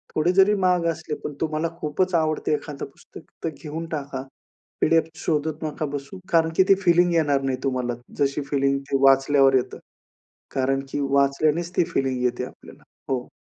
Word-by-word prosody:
थोडे 160 Hz, +3 st, +3 dB
जरी 195 Hz, +2 st, +5 dB
महाग 180 Hz, -3 st, +2 dB
असले, 155 Hz, -2 st, -3 dB
पण 150 Hz, -, -4 dB
तुम्हाला 160 Hz, +1 st, -1 dB
खूपच 175 Hz, +5 st, -1 dB
आवडते 155 Hz, -1 st, +1 dB
एखादं 150 Hz, -1 st, -4 dB
पुस्तक 140 Hz, -, -14 dB, 0.2 s
तर 165 Hz, -, 0 dB
घेऊन 160 Hz, +2 st, -5 dB
टाका. 140 Hz, -3 st, -4 dB, 0.6 s
पी-डी-एफ 165 Hz, 0 st, +3 dB, 0.2 s
शोधत 155 Hz, 0 st, -1 dB
नका 155 Hz, 0 st, -3 dB
बसू. 145 Hz, +7 st, -6 dB
कारण 165 Hz, -1 st, +3 dB
की 190 Hz, -, +7 dB
ती 195 Hz, -, +8 dB
फिलिंग 175 Hz, 0 st, +4 dB
येणार 145 Hz, -4 st, +2 dB
नाही 135 Hz, -1 st, -1 dB
तुम्हाला 125 Hz, -2 st, -1 dB, 0.3 s
जशी 140 Hz, +1 st, +1 dB
फिलिंग 140 Hz, -1 st, +2 dB
ती 135 Hz, -, +2 dB
वाचल्यावर 135 Hz, 0 st, +5 dB
येतं. 125 Hz, -, 0 dB, 0.8 s
कारण 135 Hz, +1 st, +1 dB
की -, -, -2 dB
वाचल्यानेच 150 Hz, +5 st, +2 dB
ती -, -, +5 dB
फिलिंग 130 Hz, -2 st, 0 dB
येते 125 Hz, 0 st, 0 dB
आपल्याला. -, -, -14 dB, 0.3 s
हो. 125 Hz, -2 st, -1 dB
150 Hz, 165 wpm, -24 LUFS, 135-165 Hz, 0.8 s, ती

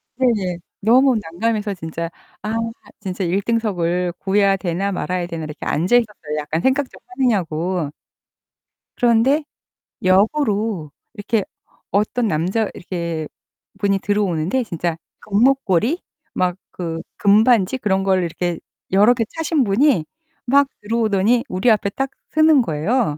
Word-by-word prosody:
네네. 210 Hz, -9 st, 0 dB, 0.2 s
너무 250 Hz, +5 st, +4 dB
난감해서 205 Hz, +4 st, -2 dB
진짜' 165 Hz, -1 st, -5 dB, 0.3 s
아 215 Hz, +1 st, -2 dB, 0.5 s
진짜 190 Hz, -1 st, -3 dB
1 185 Hz, +4 st, +1 dB
등석을 180 Hz, -6 st, 0 dB
구해야 195 Hz, 0 st, +3 dB
되나 190 Hz, +1 st, -2 dB
말아야 180 Hz, -1 st, -2 dB
되나.' 165 Hz, -2 st, -5 dB
이렇게 150 Hz, 0 st, -7 dB
앉아 180 Hz, +10 st, +3 dB
있었어요. 205 Hz, -10 st, -2 dB
약간 150 Hz, +2 st, -2 dB
생각 265 Hz, +3 st, +1 dB
좀 -, -, -15 dB
하느냐고. 180 Hz, -, -1 dB, 1.1 s
그런데 245 Hz, +5 st, +3 dB, 0.6 s
역으로 205 Hz, -, +2 dB, 0.2 s
이렇게 215 Hz, 0 st, -1 dB, 0.5 s
어떤 215 Hz, +4 st, +1 dB
남자 190 Hz, +6 st, 0 dB
이렇게 170 Hz, -4 st, -4 dB, 0.5 s
분이 195 Hz, -1 st, +2 dB
들어오는데 200 Hz, +2 st, 0 dB
진짜 170 Hz, -4 st, -3 dB, 0.2 s
금목걸이 235 Hz, -, +2 dB, 0.3 s
막 180 Hz, -1 st, 0 dB, 0.2 s
그 165 Hz, -2 st, -3 dB, 0.2 s
금반지 215 Hz, +2 st, +4 dB
그런 195 Hz, -4 st, +1 dB
걸 190 Hz, -1 st, +2 dB
이렇게 170 Hz, 0 st, -2 dB, 0.3 s
여러 210 Hz, +6 st, +5 dB
개 230 Hz, -2 st, 0 dB
차신 320 Hz, -3 st, +1 dB
분이 205 Hz, -, +3 dB, 0.4 s
막 280 Hz, +3 st, +4 dB
들어오더니 220 Hz, +1 st, +2 dB
우리 190 Hz, +6 st, +2 dB
앞에 210 Hz, -2 st, +2 dB
딱 270 Hz, +6 st, -3 dB, 0.2 s
서는 310 Hz, -3 st, +6 dB
거예요. 165 Hz, -, 0 dB
200 Hz, 275 characters per minute, -20 LUFS, 175-235 Hz, 1.1 s, 서는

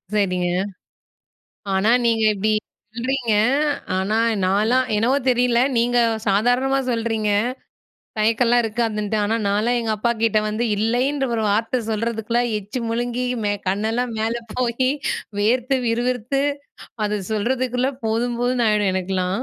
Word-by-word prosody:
சரிங்க. 180 Hz, -3 st, +1 dB, 1.3 s
ஆனா, 200 Hz, +4 st, +2 dB, 0.2 s
நீங்க 225 Hz, -1 st, +2 dB
இப்படி 215 Hz, +2 st, 0 dB, 0.4 s
சொல்றீங்க. 240 Hz, -2 st, -1 dB, 0.6 s
ஆனா, 195 Hz, +4 st, 0 dB, 0.3 s
நான்லாம் 220 Hz, +7 st, +2 dB
என்னவோ 250 Hz, +6 st, +2 dB
தெரியல 245 Hz, -1 st, +3 dB, 0.2 s
நீங்க 240 Hz, +1 st, +2 dB, 0.3 s
சாதாரணமா 245 Hz, +7 st, +2 dB
சொல்றீங்க. 225 Hz, -2 st, -1 dB, 0.9 s
தயக்கம்லாம் 235 Hz, +2 st, +3 dB
இருக்காதுன்ட்டு. 220 Hz, -2 st, -1 dB
ஆனா, 220 Hz, +2 st, +1 dB
நான்லாம் 225 Hz, +4 st, +1 dB
எங்க 225 Hz, -2 st, -1 dB
அப்பாகிட்ட 225 Hz, -1 st, +1 dB
வந்து, 215 Hz, +3 st, -1 dB
இல்லைன்ற 255 Hz, +6 st, 0 dB
1 220 Hz, -, 0 dB
வார்த்தை 225 Hz, +4 st, 0 dB
சொல்றதுக்குள்ள, 230 Hz, +2 st, -1 dB, 0.2 s
எச்சு 210 Hz, +5 st, -6 dB
முழுங்கி, 245 Hz, +2 st, -1 dB, 0.2 s
மே 205 Hz, -, +1 dB, 0.2 s
கண்ணெல்லாம் 225 Hz, +5 st, -1 dB
மேல 225 Hz, +1 st, 0 dB, 0.2 s
போயி, 255 Hz, +1 st, 0 dB, 0.5 s
வேர்த்து, 250 Hz, +5 st, +2 dB
விறுவிறுத்து, 245 Hz, +3 st, 0 dB, 0.6 s
அத 210 Hz, -1 st, -1 dB
சொல்றதுக்குள்ள 250 Hz, +4 st, 0 dB, 0.2 s
போதும் 235 Hz, +2 st, -1 dB
போதுன்னு 245 Hz, -1 st, +1 dB
ஆயிடும் 210 Hz, -2 st, +2 dB
எனக்கெல்லாம். 185 Hz, +3 st, -1 dB
230 Hz, 115 wpm, -21 LUFS, 210-245 Hz, 1.3 s, தெரியல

